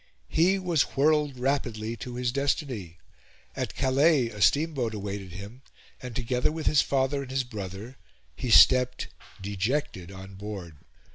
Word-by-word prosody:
He 180 +5 +3
was 175 -6 +1 0.2
whirled 150 -1 +2
rapidly 120 -4 -1
to 120 +2 -7
his 125 -1 -1
destiny. 130 - -2 0.6
At - - -4
Calais 135 -1 +3
a 105 -2 -9
steamboat 140 -6 +2
awaited 100 -3 -5
him, 100 +7 -9 0.4
and, 125 -3 -7
together 125 +2 0
with 160 0 -5
his 150 - +5
father 135 +1 0
and 135 - -8
his 130 0 0
brother, 105 +1 -7 0.4
he 125 - -4
stepped, 125 +2 +6 0.3
dejected, 100 -1 -2
on 95 0 -10
board. 95 -5 -7
125 Hz, 140 wpm, -27 LUFS, 105-140 Hz, 0.6 s, stepped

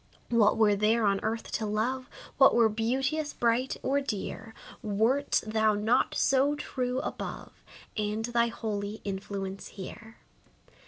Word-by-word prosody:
What 220 -3 +4
were 215 -2 +4
there 215 +2 +2
on 195 -1 +2
earth 225 +1 -3
to 215 - -2
love 250 +5 -1 0.3
What 270 - +7
were 230 -2 +5
beauteous, 265 +8 -1
bright, 240 +2 +1
or 280 +2 +1
dear, 225 -2 -5 0.3
Wert 230 +6 +1
thou 220 -1 +2
not 215 +4 +1
so 275 +2 +3
true 255 -3 -3
above, - - -7 0.3
And 215 +1 -1
thy 235 0 +2
holy 210 -2 -4
influence 195 0 -5
here? 220 +3 -10
225 Hz, 130 wpm, -29 LUFS, 210-250 Hz, 0.3 s, What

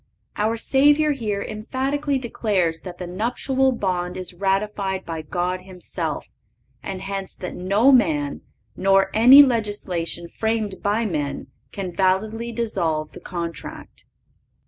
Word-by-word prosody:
(539) 210 +1 +1
Our 230 - -1
Savior 290 +5 +4
here 215 -7 -2
emphatically 270 +6 -2
declares 205 -9 0
that 180 -1 -9
the 180 - -5
nuptial 250 +8 0
bond 180 -6 -2
is 185 -1 -5
ratified 195 +1 -1
by 165 -1 -4
God 180 +4 -2
Himself, 180 -4 -4 0.6
and 190 -1 -6
hence 195 -1 -5
that 180 - -6
no 200 +9 +3
man, 155 - +2 0.3
nor 195 0 +3
any 255 +6 +9
legislation 205 -8 -2
framed 220 0 -2
by 210 +3 +1
men, 145 -7 -3 0.2
can 185 -3 -5
validly 215 +5 0
dissolve 170 -10 -1
the - - -11
contract. 170 -2 -7
195 Hz, 125 wpm, -23 LUFS, 180-230 Hz, 0.6 s, any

